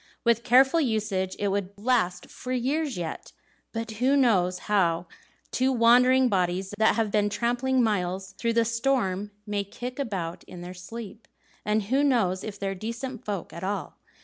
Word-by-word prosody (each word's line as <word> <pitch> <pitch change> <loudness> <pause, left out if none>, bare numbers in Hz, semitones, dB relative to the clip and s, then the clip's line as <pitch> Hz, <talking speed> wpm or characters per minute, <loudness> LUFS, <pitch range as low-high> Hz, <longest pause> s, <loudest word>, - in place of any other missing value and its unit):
With 235 -1 +3
careful 265 +7 +5
usage, 210 -7 -1
it 205 - 0
would 200 0 -2
last 200 -6 0
for 255 - -8
years 270 - 0
yet; 170 -2 -5 0.4
but 225 -1 -4
who 270 +3 +4
knows 185 -9 +3
how 175 -5 +2 0.5
two 260 +1 +2
wandering 250 +2 +5
bodies 185 -1 0
that 220 - +4
have 225 -3 0
been 205 0 +2
tramping 245 +4 +1
miles 190 -3 -1
through 230 -1 +1
the 230 0 +3
storm 230 -5 0 0.2
may 205 -1 -1
kick 245 +6 -7
about 190 -10 -3
in 175 - -10
their 175 +1 -7
sleep? 215 +4 -9 0.4
And 210 0 +1
who 265 +8 +1
knows 220 -10 +2
if 210 -2 -6
they're 195 -1 -2
decent 230 +5 -6
folk 200 -6 -4
at 170 +3 -8
all? 200 +2 -4
215 Hz, 165 wpm, -26 LUFS, 190-245 Hz, 0.5 s, careful